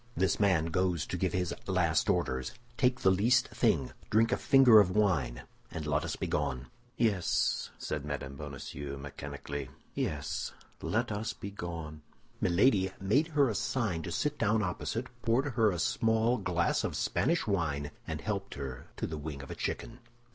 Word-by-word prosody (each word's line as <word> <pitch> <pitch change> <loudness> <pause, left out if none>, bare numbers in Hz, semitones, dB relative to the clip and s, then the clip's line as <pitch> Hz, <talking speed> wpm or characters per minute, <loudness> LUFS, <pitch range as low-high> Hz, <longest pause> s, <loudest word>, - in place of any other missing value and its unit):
This 95 0 +2
man 95 -6 +3
goes 90 -4 +1
to - - -4
give - - 0
his 90 -2 0
last - - +2
orders; 65 0 0 0.2
take 125 0 +2
the 95 - +5
least 120 +6 +3
thing, 65 - +1 0.2
drink 115 +2 +3
a - - +4
finger 135 -6 +7
of 100 -3 +5
wine, 85 - +1 0.3
and 80 - -5
let 75 0 +1
us - - -3
be - - -3
gone." 65 0 -2 0.3
"Yes," 105 -7 +1
said 75 -3 -3
Mme. 70 -2 -4
Bonacieux, 70 0 -6
mechanically, 70 -1 -6 0.2
"yes, - - -2 0.3
let 120 +1 0
us 105 +2 -2
be 100 - -7
gone." 80 -5 -6 0.4
Milady 95 +1 +3
made 120 +12 +2
her 140 -2 +6
a 115 - 0
sign 105 -4 -1
to 85 - -5
sit 150 - -1
down 110 +1 +2
opposite, 110 +6 -2 0.2
poured 130 +4 +1
her 110 -2 +4
a 90 - -2
small 115 +7 +2
glass 90 -3 +1
of - - -2
Spanish 170 +1 +1
wine, 75 -8 -1 0.2
and - - -4
helped - - -3
her 65 -2 -6
to - - -2
the 80 -2 -4
wing 75 -2 -6
of 70 - -9
a - - -5
chicken. 115 +1 -4
90 Hz, 170 wpm, -31 LUFS, 75-110 Hz, 0.4 s, finger